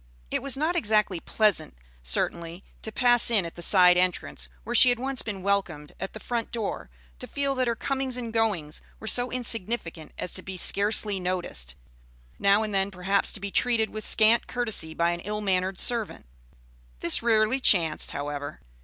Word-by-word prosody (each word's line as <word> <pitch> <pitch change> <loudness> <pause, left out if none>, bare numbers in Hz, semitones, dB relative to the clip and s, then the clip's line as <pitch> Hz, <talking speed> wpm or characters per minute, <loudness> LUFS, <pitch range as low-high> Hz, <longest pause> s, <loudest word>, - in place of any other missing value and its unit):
It - - -1
was 275 -1 -1
not 315 +5 -1
exactly 210 - +1
pleasant, 200 - 0 0.2
certainly, 170 - -2 0.2
to 220 - -5
pass 240 0 +3
in 210 -6 +2
at 165 - -7
the 175 - -10
side 180 0 +6
entrance 75 - -2
where - - -5
she 255 - +8
had 245 - +2
once 265 +1 -2
been 200 -4 -6
welcomed 180 -7 -2
at 190 - -6
the 215 - -8
front 235 -1 -4
door; 225 - -4 0.3
to - - -7
feel 280 -1 -2
that 255 -2 -1
her 235 - 0
comings 265 +1 -2
and 240 -2 -5
her - - -8
goings 170 -9 -2 0.2
were - - -10
so 245 +3 +2
insignificant 230 -9 -2
as 180 - -6
to - - -4
be 190 -1 -8
scarcely 205 +1 +2
noticed; 175 - -4 0.6
now 200 +2 +3
and 215 -1 -4
then, 195 0 +2
perhaps, 190 +1 0
to - - -3
be 200 0 -6
treated 230 -1 +1
with 215 0 -6
scant 220 +3 +4
courtesy 220 -10 -2
by 170 0 +1
an 175 - -4
ill 210 +4 -5
mannered 190 -2 -1
servant. 230 - -2 0.8
This 170 - +3
rarely 225 +2 +2
chanced, 170 -10 +3
however. 145 0 -5
205 Hz, 185 wpm, -26 LUFS, 175-235 Hz, 0.8 s, she